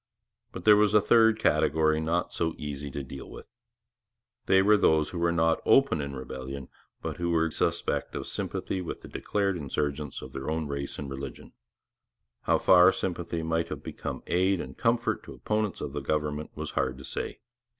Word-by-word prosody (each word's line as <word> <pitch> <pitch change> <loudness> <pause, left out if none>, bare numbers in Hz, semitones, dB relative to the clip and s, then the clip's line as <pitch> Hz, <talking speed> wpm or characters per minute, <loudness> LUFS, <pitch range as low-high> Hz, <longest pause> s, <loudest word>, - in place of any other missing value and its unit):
But - - -8
there 105 -1 +8
was 105 0 +3
a - - +8
third 115 +1 +5
category 80 -7 +2
not 85 +2 -1
so 80 -1 -1
easy 70 -1 -5
to 70 +1 -5
deal 65 +1 -9
with. - - -10 1.0
There 95 0 +5
were 105 +1 +6
those 80 -6 +3
who 85 - -4
were 85 0 +2
not 80 -1 +2
openly 135 - +4
in 70 -1 -6
rebellion, 65 +1 -7 0.3
but - - -4
who 85 0 -1
were 85 -1 +2
grievously - - +2
suspect - - -3
of - - -4
sympathy 95 - -3
with 85 - -6
declared 100 -3 -1
insurgents 75 -1 -3
of 65 - -10
their 65 +2 -4
own 80 0 -1
race 70 -1 -4
and 75 - -5
religion. 70 -1 -7 0.9
How - - +4
far 90 0 +7
sympathy 85 -3 -3
might 80 +1 0
have - - -6
become - - -6
aid 95 +2 +2
and 65 -4 -6
comfort 115 0 +1
to - - -9
opponents 105 -2 -1
of 70 - -4
the 75 - -3
government 75 +1 -2
was - - -4
hard 65 -1 -1
to 70 - -10
say. - - -5
80 Hz, 185 wpm, -28 LUFS, 70-95 Hz, 1.0 s, there